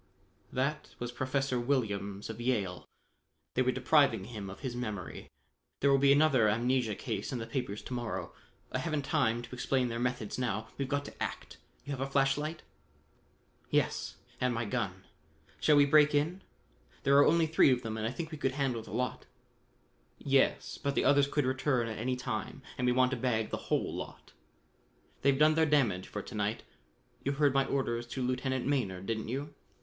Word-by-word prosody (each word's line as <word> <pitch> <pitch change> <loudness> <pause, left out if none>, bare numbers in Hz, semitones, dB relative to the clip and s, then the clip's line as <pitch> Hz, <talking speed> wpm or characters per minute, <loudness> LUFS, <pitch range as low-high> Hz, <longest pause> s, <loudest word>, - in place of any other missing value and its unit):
"That 140 +4 -2
was 120 0 -4
Professor 130 0 -1
Williams 105 -6 -1
of 110 +1 -8
Yale. 105 -8 -1 0.7
They 130 - +2
were 130 0 +3
depriving 140 +3 +3
him 105 -5 -7
of 95 - -10
his 130 -3 -4
memory. 105 -7 -5 0.5
There 140 - +4
will 135 - +5
be 140 0 +5
another 140 -6 +5
amnesia 120 0 +1
case 100 - -4
in 130 - -2
the 115 - -4
papers 120 -6 -4
to - - -6
morrow. 120 -3 -4 0.4
I - - -1
haven't 155 -3 -1
time 120 -7 +1
to 120 - -10
explain 125 0 0
their 115 0 -3
methods 125 -2 -2
now: 110 -3 -2
we've 135 -1 -3
got 145 0 -1
to - - -11
act. - - -4 0.3
You 145 - -5
have 135 -2 -3
a 135 - -2
flash 135 0 +3
light?" 155 +2 -4 1.1
"Yes, - - 0 0.2
and 125 -2 +1
my 115 0 -1
gun. 105 - -3 0.6
Shall 150 - +4
we 145 0 +7
break 150 +1 +5
in? 165 +6 0 0.6
There 140 0 +4
are 145 - +7
only 165 +1 +4
three 160 -2 +5
of 125 -1 +1
them, 110 -1 -3
and 110 0 -2
I - - -2
think 160 +4 -5
we 155 - -7
could 135 -2 0
handle 135 -4 -1
the - - -13
lot." 125 +1 -3 0.9
"Yes, 135 -1 +1
but 140 0 -1
the - - +2
others 140 0 +5
may 145 - +4
return 130 -2 +1
at 110 -1 -5
any 125 +3 0
time 125 +2 -4
and 125 -1 -1
we - - +4
want 125 +1 +3
to 130 - -1
bag 115 -3 0
the - - -1
whole - - 0
lot. - - -8 0.9
They've 140 0 +3
done 155 +2 +5
their 160 0 +3
damage 120 -11 +2
for 105 - -5
to - - -10
night. 105 +1 -1 0.6
You 140 - 0
heard 140 -1 +3
my 135 0 +3
orders 120 -4 -1
to 130 +2 -4
Lieutenant 130 +1 -1
Maynard, 95 -10 -1
didn't 110 0 -2
you?" 140 +5 -4
130 Hz, 195 wpm, -31 LUFS, 115-140 Hz, 1.1 s, we